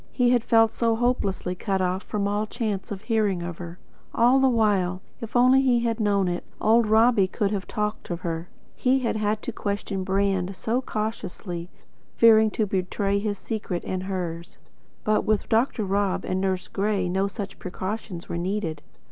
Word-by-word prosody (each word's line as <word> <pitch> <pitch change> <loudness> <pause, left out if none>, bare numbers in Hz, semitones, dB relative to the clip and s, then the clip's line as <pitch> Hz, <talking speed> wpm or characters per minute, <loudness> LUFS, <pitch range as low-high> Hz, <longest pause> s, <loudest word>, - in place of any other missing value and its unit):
He 245 -2 +2
had 245 -2 +3
felt 225 -1 +4
so 230 -1 +1
hopelessly 225 -6 0
cut 190 +1 -1
off 185 +1 0
from 205 -1 -2
all 205 +1 -1
chance 210 -4 -3
of 200 0 -5
hearing 210 -6 +1
of 170 -1 -6
her. 170 0 -7 0.4
And - - +2
all 250 +3 +6
the 265 0 +4
while, 200 -6 +2 0.2
if 230 +1 -8
only 255 +2 +6
he 250 -3 +3
had 230 -1 -1
known 200 -3 +2
it, 175 0 -2 0.2
old 225 +1 +4
Robbie 220 -2 +4
could 200 +1 -1
have 200 -2 -3
talked 210 0 -3
of 175 0 -4
her. 165 0 -4 0.3
He 260 +1 +2
had 230 - 0
had 215 0 -1
to - - -3
question 200 -2 -3
Brand 195 -1 0
so 235 +6 -1
cautiously, 200 -6 -4 0.5
fearing 220 -1 +6
to 215 +1 0
betray 195 +1 -1
his 205 0 -2
secret 205 -4 -4
and 185 -1 -2
hers; 175 -3 -5 0.5
but 215 0 +2
with 215 -2 0
Dr. 225 0 +2
Rob 195 0 0
and 185 0 -1
Nurse 190 -1 -1
Gray 200 -2 0
no 190 +2 +1
such 200 0 -7
precautions 185 -1 -5
were 170 - -3
needed. 175 -4 -2
205 Hz, 180 wpm, -25 LUFS, 185-225 Hz, 0.5 s, all